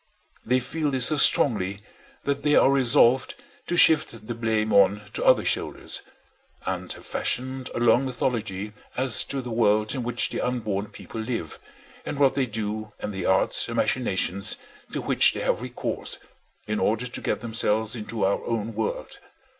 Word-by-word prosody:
They 125 +2 +1
feel 150 +4 -2
this 130 -3 +3
so 155 - +5
strongly 100 -8 +4 0.4
that 140 0 -2
they 150 +1 +2
are 135 - +5
resolved 130 -1 +4 0.3
to 175 - -1
shift 155 -10 +4
the 120 - -4
blame 110 -2 -1
on 100 +1 +4
to - - -2
other - - +4
shoulders; - - -1 0.6
and - - -4
have - - -13
fashioned 130 +1 -1
a - - -2
long 120 +2 +3
mythology 110 -5 -3 0.2
as 130 -3 +4
to 135 -2 -4
the 125 - -7
world 110 -1 +1
in 130 - -3
which 120 0 0
the - - -3
unborn 110 -5 -2
people 110 +2 -9
live, 110 -8 -5 0.4
and - - -5
what 135 -2 +3
they 135 -2 0
do, 110 -1 -5
and 105 - -5
the 95 - -3
arts 95 - +2
and - - -5
machinations 100 +3 +1 0.3
to - - -3
which - - +4
they - - -5
have - - 0
recourse 125 0 -3 0.5
in 105 0 -2
order 115 +3 0
to 125 - -5
get - - -2
themselves 110 -1 0
into 110 -1 -3
our 100 - 0
own 115 -1 -3
world. 110 0 -4
115 Hz, 170 wpm, -24 LUFS, 105-130 Hz, 0.6 s, so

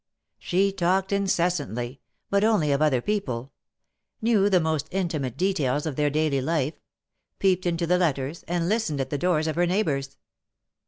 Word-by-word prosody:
She 195 +2 +1
talked 190 +1 0
incessantly, 170 - -1 0.3
but 200 +1 +3
only 210 -10 +3
of 140 +1 +1
other 140 -5 +3
people 135 - -2 0.3
— - - -55 0.3
knew 215 -3 +3
the 185 -2 +4
most 160 -2 -1
intimate 155 -9 -2
details 150 -7 0
of 155 -4 -3
their 150 +1 +2
daily 150 -2 +1
life; 155 0 0 0.6
peeped 185 -2 +2
into 170 0 0
the 180 +2 +2
letters, 145 -2 -1
and 170 -1 -1
listened 210 -8 0
at 135 0 -3
the 145 - -1
doors 175 -3 +1
of 155 - -1
her 175 0 +3
neighbors. 150 -8 -1
165 Hz, 165 wpm, -25 LUFS, 140-190 Hz, 0.6 s, the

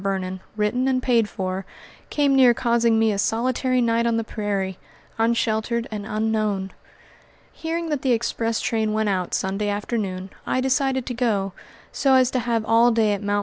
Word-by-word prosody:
Vernon, 190 -1 -2 0.2
written 215 +5 0
and 255 -1 +1
paid 230 -4 +2
for, 185 0 -3 0.5
came 285 -2 +2
near 250 -3 +6
causing 235 -2 +2
me 220 -1 +3
a 200 - -2
solitary 255 +4 +1
night 235 0 +2
on 230 -1 +1
the 230 - 0
prairie, 200 -4 -3 0.4
unsheltered 230 0 0
and 210 -1 -5
unknown. 215 -3 -1 0.8
Hearing 330 +1 -3
that 295 -3 -1
the 260 - +1
express 230 -1 0
train 220 -2 0
went 215 -1 +1
out 185 -2 -1
Sunday 195 +2 -1
afternoon, 205 -3 -3
I - - -1
decided 265 0 +1
to 245 - -4
go, 210 -6 0 0.4
so 270 -2 +3
as 255 -1 +4
to 255 - 0
have 230 -2 -1
all 230 +2 +5
day 225 -3 +2
at 200 - -3
Mt. 205 0 0
225 Hz, 175 wpm, -23 LUFS, 205-245 Hz, 0.8 s, near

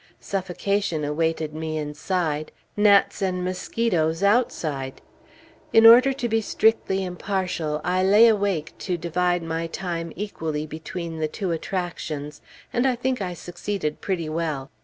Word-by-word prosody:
Suffocation 195 -3 -1
awaited 160 +1 -1
me 155 0 -3
inside, 155 +1 -2 0.2
gnats 205 -1 +4
and 180 -2 0
mosquitoes 180 -3 0
outside. 155 - 0 0.7
In 225 0 +7
order 245 +4 +9
to 260 -2 -2
be 225 -1 +1
strictly 210 -3 +1
impartial, 180 -4 -2
I 180 +1 +1
lay 205 +5 +7
awake 200 -8 +1
to 180 -2 -2
divide 175 +1 0
my 165 0 -2
time 165 -1 -4
equally 160 -6 -3
between 160 +1 -6
the 155 - 0
two 185 +3 -3
attractions, 160 -4 -4 0.3
and 250 0 +1
think 255 -2 -1
I 180 -2 -3
succeeded 175 -2 -4
pretty 175 -5 -2
well. 155 -4 -3
175 Hz, 130 wpm, -24 LUFS, 160-200 Hz, 0.7 s, order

